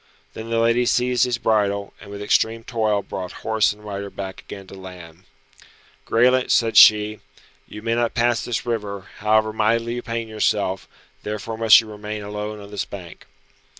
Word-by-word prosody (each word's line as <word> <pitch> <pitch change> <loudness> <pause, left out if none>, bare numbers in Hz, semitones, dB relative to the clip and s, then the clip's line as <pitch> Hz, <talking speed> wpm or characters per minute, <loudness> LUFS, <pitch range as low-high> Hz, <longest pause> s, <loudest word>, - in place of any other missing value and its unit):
Then 110 +1 -8
the 115 - 0
lady 115 +1 +2
seized 125 +1 +2
his 125 -1 -1
bridle, 100 -3 0
and 100 - -12
with 100 0 -7
extreme 110 +2 +1
toil 110 -4 0
brought 90 -1 -6
horse 110 -1 +2
and 105 +1 -12
rider 100 -1 -5
back 95 -1 -7
again 100 -1 -10
to 95 - -14
land. 90 -2 -12 0.8
"Graelent," 125 +2 +3
said 115 -1 +2
she, 105 0 +6 0.5
"you 105 - -10
may 115 0 0
not 120 0 0
pass 120 -1 +1
this 120 -1 -3
river, 100 -4 -4
however 110 +1 +2
mightily 115 +2 +1
you 120 - -4
pain 115 -1 -4
yourself, 105 -3 -1 0.3
therefore 105 +2 -5
must 110 0 +7
you 110 - -12
remain 105 0 -7
alone 105 +1 -5
on 100 0 -12
this 105 - -2
bank." 90 -4 -11
110 Hz, 175 wpm, -22 LUFS, 100-115 Hz, 0.8 s, must